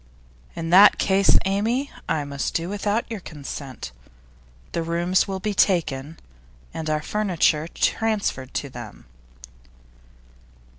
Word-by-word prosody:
'In 165 0 -4
that 195 +3 +8
case, 195 0 +4
Amy, 225 +8 0 0.2
I 150 - 0
must 140 -1 -4
do 165 +1 -1
without 205 +2 -1
your 220 - -3
consent. 140 - -8 0.8
The 170 - -2
rooms 170 +3 +1
will 190 -1 -3
be 210 +2 -2
taken, 160 -6 +1 0.6
and 160 -1 -4
our 155 0 0
furniture 170 -7 +1
transferred 205 - -1
to 140 - -2
them. 120 - -10
170 Hz, 115 wpm, -23 LUFS, 150-200 Hz, 0.8 s, that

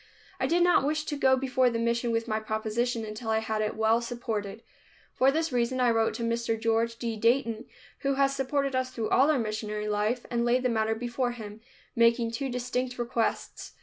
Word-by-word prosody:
I - - +1
did 345 +1 +3
not 355 -5 +4
wish 300 +2 0
to 295 - -3
go 265 -2 +3
before 260 -1 +2
the 230 - -2
mission 235 +1 0
with 230 0 -1
my 215 -1 0
proposition 220 +2 -2
until 215 +2 -6
I 220 - +2
had 220 -1 -1
it 215 - -2
well 220 +1 +2
supported. 230 -3 -4 0.5
For 265 +1 +4
this 320 +2 -1
reason 250 +1 0
I 245 -1 +4
wrote 225 -1 +1
to 235 - -4
Mr. 230 -1 -1
George 230 +1 +1
D. 230 -1 -3
Dayton 230 +1 +1 0.3
who 275 -1 0
has 275 0 +2
supported 275 0 -1
us 255 0 0
through 225 -4 -4
all 275 +3 +5
our 305 - +3
missionary 215 -2 -3
life, 210 +4 -1
and 235 -1 +1
laid 245 +2 +2
the 250 - +2
matter 220 -1 +1
before 240 +1 -2
him, 215 -2 -9 0.3
making 230 0 +3
two 270 +4 -3
distinct 250 0 -3
requests. 235 -1 -2
235 Hz, 205 wpm, -28 LUFS, 220-255 Hz, 0.5 s, all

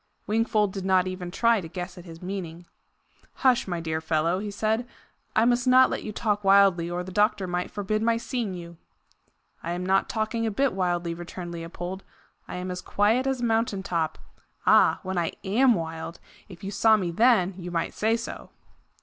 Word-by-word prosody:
Wingfold 215 -2 +1
did 195 - -5
not 190 -1 +3
even 185 -1 -5
try 230 +3 +2
to 165 - -7
guess 180 +2 -6
at 180 - -12
his 165 0 -11
meaning. 180 -3 -6 0.8
"Hush, 255 -2 +4
my 175 -2 -2
dear 160 -1 -2
fellow!" 160 +3 +1
he 210 +1 -4
said; 220 +4 -1 0.5
"I 220 - +4
must 245 +1 +2
not 255 0 +6
let - - -2
you 215 - -5
talk 210 -1 -1
wildly, 195 -3 +5
or 175 +1 -3
the 185 - -8
doctor 210 0 +2
might 180 0 -2
forbid 210 +1 -2
my 230 0 +2
seeing 230 -4 -3
you." 170 -1 -9 0.8
"I 170 - -3
am 180 +1 -3
not 190 +1 +2
talking 220 +1 -1
a - - +1
bit 265 +5 +1
wildly," 175 -2 -1
returned 175 +1 -7
Leopold. 175 +3 -6 0.4
"I - - -6
am 180 0 -4
as 180 0 -5
quiet 220 +8 +1
as 265 -2 -1
a - - +1
mountain 225 -4 0
top. 165 -5 -1 0.5
Ah! - - +5
when 190 -1 -2
I 170 - -1
AM 235 +5 +4
wild 165 0 -5 0.3
if 185 -1 -12
you 195 - -4
saw 220 +2 +4
me 180 -4 -2
then, 205 -2 +3
you 180 0 -6
might 170 -1 -2
say 225 +2 +1
so!" 230 - -7
190 Hz, 195 wpm, -26 LUFS, 175-220 Hz, 0.8 s, not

